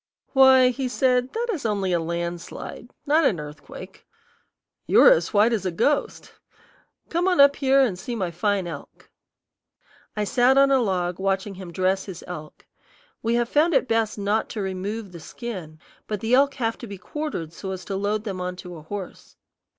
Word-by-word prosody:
"Why," 265 -2 +7
he 255 +1 -2
said, 250 0 +1
"that 475 +2 -2
is 325 - -5
only 200 -4 0
a 170 - +2
landslide, 170 +7 -5 0.2
not 310 +2 +3
an 195 - +2
earthquake. 150 0 -11 0.8
You - - +5
are - - +9
as - - +2
white 220 +2 +4
as 215 -4 -1
a 185 - 0
ghost. 285 - -1 0.8
Come 345 +2 0
on 360 -5 +2
up 280 0 +7
here 275 -1 +4
and 210 -9 +1
see 240 +5 -5
my 185 -6 -2
fine 195 +2 0
elk." 160 -5 -10 1.1
I 210 - +1
sat 245 +5 +3
on 275 0 +5
a 270 - +5
log 180 -5 -1
watching 195 +1 -1
him 185 -2 -9
dress 190 +2 0
his 185 -4 -8
elk. 155 -4 -9 0.6
We 230 +1 0
have 240 0 +1
found 305 +5 +2
it - - +2
best 225 -2 0
not 205 +2 0
to 220 - -5
remove 195 +2 -4
the 170 - -10
skin, 180 -5 -8 0.3
but 210 -2 -3
the 225 +4 -1
elk 275 +2 +4
have 230 -4 -2
to 240 - -8
be 200 -1 -8
quartered 185 - -5
so 190 - -7
as 185 -2 -6
to 195 - -4
load 205 +2 -1
them 195 -4 -5
on 180 0 -3
to 180 -1 -9
a - - -10
horse. 190 +4 -8
210 Hz, 190 wpm, -24 LUFS, 185-255 Hz, 1.1 s, are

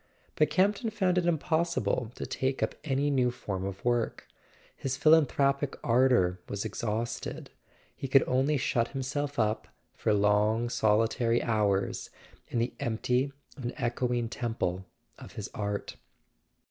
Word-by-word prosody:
But 155 -1 +2
Campton 205 +5 +2
found 190 -4 +1
it 175 - -1
impossible 160 - 0
to - - -5
take 130 0 -1
up - - 0
any 145 0 +1
new 130 -3 +3
form 100 -6 -4
of 100 +2 -6
work; 120 -1 0 0.5
his 135 -1 -3
philanthropic 145 -3 +3
ardour 120 -7 +3
was 100 0 -3
exhausted. 115 +1 -3 0.4
He 135 - -5
could 135 +1 +5
only 135 +4 +2
shut 120 -2 +1
himself 145 +2 -2
up, 110 -1 0 0.3
for 110 - 0
long 105 +3 +3
solitary 115 +2 +2
hours, 105 -4 0 0.4
in - - -3
the 120 +2 0
empty 125 +2 0 0.2
and 125 -3 -5
echoing 120 -1 0
temple 110 -6 -3 0.3
of - - -11
his - - -6
art. 105 -1 -3
125 Hz, 135 wpm, -29 LUFS, 110-140 Hz, 0.5 s, could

